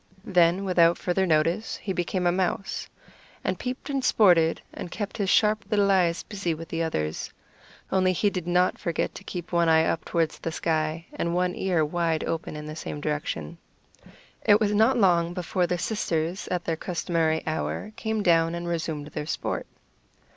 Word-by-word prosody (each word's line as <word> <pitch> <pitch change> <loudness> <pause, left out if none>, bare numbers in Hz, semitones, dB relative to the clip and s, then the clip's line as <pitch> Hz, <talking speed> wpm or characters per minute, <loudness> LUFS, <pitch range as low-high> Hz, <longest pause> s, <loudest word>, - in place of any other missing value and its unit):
Then, 180 0 +3
without 175 -2 +4
further 190 +1 0
notice, 165 +6 +1
he 195 - -4
became 180 +1 -1
a 175 - +4
mouse, 185 +1 -2 0.5
and - - -1
peeped 255 +2 -5
and 275 -2 -1
sported, 175 -9 +4
and - - -6
kept 205 +2 -5
his 200 -3 0
sharp 215 0 +3
little 200 -2 +3
eyes 180 -3 +2
busy 195 -6 -3
with 165 +1 -9
the 165 - -2
others; 80 - -2 0.6
only 185 -1 +3
he 200 +3 +1
did 180 -3 -4
not 180 +1 +2
forget 170 -2 -2
to - - -10
keep 175 -1 -6
one 170 -1 +3
eye 160 0 +5
up 165 - -1
toward 165 -2 0
the 165 - -5
sky, 160 0 -1
and 170 0 -2
one 180 0 +1
ear 175 -5 +1
wide 165 0 0
open 165 -1 -3
in 150 0 -6
the 155 0 -6
same 150 - -5
direction. 145 - -3 0.8
It 205 0 +6
was 210 -2 +1
not 220 +5 +4
long 175 -4 +3
before 180 0 0
the 180 - 0
sisters, 175 -3 -2
at 180 -1 -2
their 165 - 0
customary 165 -2 0
hour, 160 +6 -3
came 220 -1 -2
down 165 -1 +3
and 170 0 -5
resumed 160 -3 -2
their 150 - -5
sport. - - -3
175 Hz, 180 wpm, -26 LUFS, 165-190 Hz, 0.8 s, It